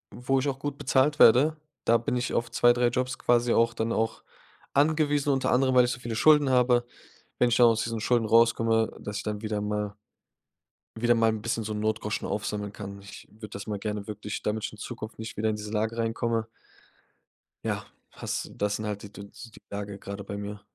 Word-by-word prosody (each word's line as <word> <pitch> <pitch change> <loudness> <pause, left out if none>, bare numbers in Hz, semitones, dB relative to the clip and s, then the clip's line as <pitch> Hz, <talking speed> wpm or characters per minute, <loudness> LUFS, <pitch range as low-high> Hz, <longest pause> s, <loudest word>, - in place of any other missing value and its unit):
wo 125 +3 0
ich 145 - -1
auch 135 -1 -2
gut 145 0 -4
bezahlt 145 +3 +2
werde. 145 +7 +6 0.3
Da 115 - +5
bin 115 +2 -2
ich 125 +1 -2
auf 120 0 -1
2, 120 +1 +5
3 120 0 +2
Jobs 130 +2 -2
quasi 120 0 +2
auch 115 0 +3
dann 115 0 -2
auch 110 0 -1 0.5
angewiesen, 145 -1 +2
unter 135 - 0
anderem, 130 +1 +3
weil 125 -1 +7
ich 120 - -1
so 120 - -5
viele 115 -2 -5
Schulden 150 +1 +5
habe. 125 -1 +3 0.5
Wenn 125 - +4
ich - - +2
dann 120 - +7
aus 115 0 +2
diesen 115 -1 -3
Schulden 120 0 +2
rauskomme, 115 0 +3
dass 105 0 -5
ich - - -4
dann 105 -1 -4
wieder 110 -2 -2
mal 105 0 -2 1.0
wieder 120 +1 +3
mal 115 0 +3
'n 110 -1 -4
bisschen 115 -1 -2
so 110 - -4
'n 105 - -3
Notgroschen 110 -1 -2
aufsammeln 105 0 -3
kann. 100 -1 -8
Ich 100 0 -12
würde 110 0 -10
das 100 -1 -7
mal 105 -2 -3
gerne 105 -1 -4
wirklich 105 -1 -6
damit 105 0 -2
in 110 - -13
Zukunft 110 +2 -7
nicht 110 0 -7
wieder 110 +1 +1
in 105 - -2
diese 105 0 -7
Lage 110 +1 -1
reinkomme. 115 0 -1 1.2
Ja, - - -2 0.3
hast - - -4
das 105 0 -1
sind 110 - -5
halt 105 -1 -4
die 105 0 -11
Düns 100 +3 -11
die - - -16
Lage 100 0 -5
grade 100 +1 -7
bei 100 +1 -6
mir. 100 0 -6
115 Hz, 215 wpm, -27 LUFS, 105-120 Hz, 1.2 s, weil